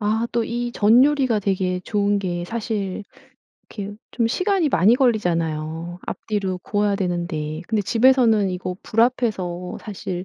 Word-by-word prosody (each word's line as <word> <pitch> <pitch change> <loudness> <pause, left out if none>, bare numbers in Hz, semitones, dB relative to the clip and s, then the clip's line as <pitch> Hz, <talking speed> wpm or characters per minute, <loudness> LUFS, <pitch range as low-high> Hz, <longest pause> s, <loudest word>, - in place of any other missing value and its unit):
아 220 +2 0
또 235 -1 +1
이 240 +1 -3
전 230 +5 +5
요리가 270 -7 +2
되게 185 -2 -1
좋은 205 +1 0
게 175 -3 -3
사실 210 -2 -3 0.7
이렇게 205 -1 -7
좀 230 -2 0
시간이 365 - +1
많이 210 +1 +4
걸리잖아요. 170 - -1
앞뒤로 195 -4 -3
구워야 205 +1 0
되는데. 170 -4 -3
근데 220 -2 +1
집에서는 230 -3 +4
이거 180 0 -4
불 225 - 0
앞에서 190 -8 0
사실 185 -3 -5
205 Hz, 300 characters per minute, -22 LUFS, 180-230 Hz, 0.7 s, 전